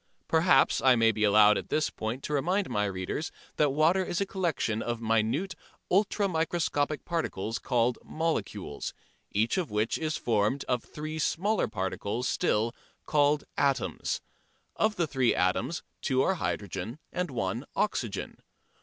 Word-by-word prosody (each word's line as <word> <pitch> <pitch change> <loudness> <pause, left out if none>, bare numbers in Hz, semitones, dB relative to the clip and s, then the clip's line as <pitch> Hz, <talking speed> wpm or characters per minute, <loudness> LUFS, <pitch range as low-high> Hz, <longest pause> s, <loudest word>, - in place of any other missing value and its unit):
Perhaps 160 -4 +4
I 130 -1 +6
may 115 -1 +4
be 110 0 -2
allowed 105 0 +6
at - - -9
this 155 - +1
point 115 +5 -4
to 150 - -3
remind 180 +8 +1
my 105 0 +1
readers 95 - -3 0.3
that 150 -2 +4
water 160 +7 +3
is 175 - -2
a 200 - +1
collection 170 - -1
of 120 -1 -2
minute 115 - +1 0.4
ultra 200 +2 +3
microscopic 160 -3 0
particles 115 - -2
called 120 -1 +1
"molecules," 130 - -3 0.4
each 110 - +1
of 175 - -2
which 105 +2 0
is 155 -1 -1
formed 110 +4 +1
of 125 -2 0
three 155 +1 -6
smaller 200 +7 +1
particles 100 +4 -2
still 115 -2 +1 0.3
called 145 0 +3
"atoms." 125 - 0 0.5
Of 215 0 +1
the 175 - +1
three 130 -5 +2
atoms 115 - 0 0.2
two 130 0 +2
are 190 - +2
hydrogen 105 - -3 0.2
and 180 -1 -1
one 125 - -2
oxygen. - - -2
135 Hz, 145 wpm, -29 LUFS, 110-165 Hz, 0.5 s, I